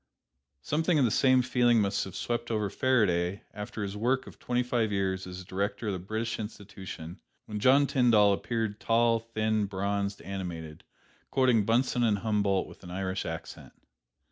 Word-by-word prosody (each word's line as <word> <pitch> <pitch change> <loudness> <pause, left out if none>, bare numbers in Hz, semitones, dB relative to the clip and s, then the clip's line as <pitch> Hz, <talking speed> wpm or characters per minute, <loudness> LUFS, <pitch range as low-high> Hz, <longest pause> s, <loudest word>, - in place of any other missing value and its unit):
Something 160 +2 +1
of 140 - +4
the 115 - +1
same 130 +2 +4
feeling 120 -2 +3
must 100 -1 0
have 95 -1 -9
swept 120 +2 -2
over 105 -3 -1
Faraday 100 -8 +1
after 105 +1 -5
his 100 0 -4
work 125 +5 0
of - - -13
twenty 125 0 0
five 120 -3 0
years 95 -1 -1
as 90 +1 -7
director 100 +4 -3
of 105 - 0
the 95 - -3
British 110 +5 -3
Institution, 95 -5 -8 0.3
when 105 -1 -5
John 135 +6 +5
Tyndall 115 -7 +4
appeared, 110 0 -2
tall, 115 0 +3
thin, 110 -2 -1
bronzed, 100 +1 -2
animated, 85 -5 -6 0.5
quoting 125 -6 +3
Bunsen 120 +3 +2
and 110 -3 +3
Humboldt 100 -3 0
with - - -14
an 90 - -9
Irish 95 +1 -3
accent. - - -7
105 Hz, 165 wpm, -29 LUFS, 100-120 Hz, 0.5 s, John